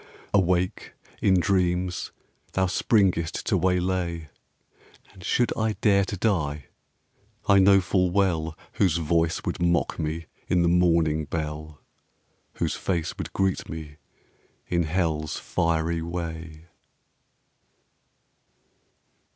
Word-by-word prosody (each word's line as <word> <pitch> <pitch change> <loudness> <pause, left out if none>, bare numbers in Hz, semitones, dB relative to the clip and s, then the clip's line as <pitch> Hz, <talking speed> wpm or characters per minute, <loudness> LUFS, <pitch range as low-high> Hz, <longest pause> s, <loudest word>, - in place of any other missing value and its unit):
Awake, 90 -2 +1 0.3
in 95 -2 +4
dreams, 90 -1 0 0.4
thou 95 - +2
springest 90 -3 +1
to - - +1
waylay 90 -3 0 0.8
And 95 - -14
should 120 +3 +1
I 110 -1 0
dare 100 -2 +3
to 100 - -5
die, 75 - 0 0.8
I 100 0 +6
know 95 0 +6
full 90 -1 +1
well 85 -5 0 0.2
Whose 90 -5 +2
voice 80 0 +1
would - - -3
mock 85 -1 +1
me 80 +1 -3 0.2
in 90 -1 +2
the - - +3
mourning 85 -3 +3
bell, 75 -1 -5 0.7
Whose - - -1
face 85 -4 -2
would - - -4
greet 95 -1 0
me 75 -2 -7 0.7
in 85 -2 +1
hell's 80 -3 -1
fiery 85 0 0
way. 80 -2 -6
85 Hz, 110 wpm, -26 LUFS, 80-95 Hz, 0.8 s, I